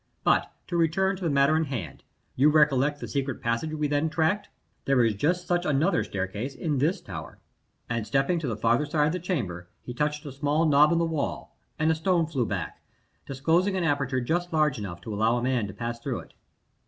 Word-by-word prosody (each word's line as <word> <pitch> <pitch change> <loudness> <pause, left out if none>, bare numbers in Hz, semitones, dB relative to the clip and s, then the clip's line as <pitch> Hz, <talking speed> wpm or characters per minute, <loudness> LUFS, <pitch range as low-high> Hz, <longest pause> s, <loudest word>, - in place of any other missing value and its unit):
"But - - +2
to 175 - -5
return 190 +4 +2
to 185 - -8
the 170 - +1
matter 140 +1 +3
in 160 0 +2
hand. 115 - -6 0.3
You 140 +4 +5
recollect 145 -1 +3
the - - -6
secret 140 -2 -2
passage 115 +7 -1
we 150 -1 0
then 145 +2 +1
tracked? 170 +5 0 0.4
There 135 -3 +3
is 115 - +2
just 175 - 0
such 175 0 +1
another 150 - +2
staircase 105 +6 -4
in 150 -5 -1
this 170 +7 +1
tower." 80 - -8 0.5
And 115 -2 -2
stepping 140 +5 +1
to 155 - -3
the 110 -3 -2
farther 120 +6 +2
side 150 0 +2
of 155 - 0
the 180 - -2
chamber, 100 - -3
he 125 - -6
touched 150 +3 -2
a 145 - -6
small 145 +4 +1
knob 150 0 +5
in 170 - +3
the 170 - +2
wall, 160 -4 -3 0.2
and 155 +1 +2
a - - +3
stone 165 +1 +1
flew 135 -8 -2
hack, - - -4 0.5
disclosing 165 +8 +1
an 185 - 0
aperture 140 -4 0
just 175 +7 -1
large 150 -6 +2
enough 85 -4 -6
to 110 - -6
allow 110 +3 +2
a 120 - -2
man 125 -4 0
to 100 - -8
pass 115 0 -4
through 125 -1 -3
it. - - -18
145 Hz, 215 wpm, -27 LUFS, 120-160 Hz, 0.5 s, You